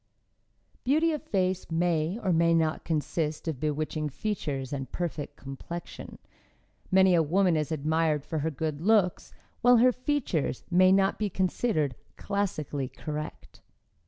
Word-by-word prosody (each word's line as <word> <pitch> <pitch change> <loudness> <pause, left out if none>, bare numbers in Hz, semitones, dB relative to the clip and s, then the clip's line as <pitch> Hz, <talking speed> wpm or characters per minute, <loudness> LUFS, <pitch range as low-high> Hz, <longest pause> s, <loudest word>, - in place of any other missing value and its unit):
Beauty 310 +5 +3
of 305 - -3
face 185 - -1
may 165 +1 0
or 185 -3 +2
may 165 0 +4
not 160 -1 +1
consist 155 0 -2
of 155 -6 -2
bewitching 155 +1 -2
features 140 -5 -3
and 135 -2 -5
perfect 160 -5 -4
complexion; 145 +5 -8 0.7
many 190 0 +5
a 170 - +5
woman 175 +3 +2
is 155 0 -1
admired 155 0 0
for 160 - -3
her 155 +2 0
good 155 0 -3
looks 200 -2 +2 0.3
while 245 0 +6
her 250 +2 +6
features 250 - -1
may 185 +1 +6
not 195 0 +3
be 210 -1 0
considered 185 - 0 0.2
classically 155 -9 -2
correct. 150 0 -7
165 Hz, 135 wpm, -28 LUFS, 150-195 Hz, 0.7 s, while